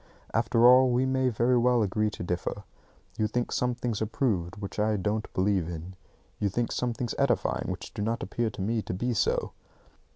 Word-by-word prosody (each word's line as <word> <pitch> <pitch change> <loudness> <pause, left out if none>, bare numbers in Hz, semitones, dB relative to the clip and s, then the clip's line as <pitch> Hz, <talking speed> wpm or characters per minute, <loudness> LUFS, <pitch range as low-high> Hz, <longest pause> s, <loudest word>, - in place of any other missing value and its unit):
After 115 0 +3
all, 130 +1 +7
we 125 +1 +2
may 130 -1 +1
very 120 +2 +2
well 120 -1 +3
agree 105 +2 0
to 105 - -7
differ. 90 +3 -3 0.6
You 110 - +2
think 120 +2 -2
some 125 -1 0
things 120 -3 -3
are 110 - 0
proved 100 -7 -1
which 100 0 -6
I 105 0 +2
don't 105 +3 -2
believe 95 -3 +1
in. 85 +2 -7 0.5
You 100 - +1
think 115 +4 -1
some 125 -1 -1
things 115 0 -3
edifying - - +1
which - - -5
do - - -5
not 115 +3 -1
appear 120 -1 -1
to 95 - -6
me 110 +2 0
to 90 - -5
be 120 +6 -1
so. 110 - 0
110 Hz, 200 wpm, -28 LUFS, 100-120 Hz, 0.6 s, all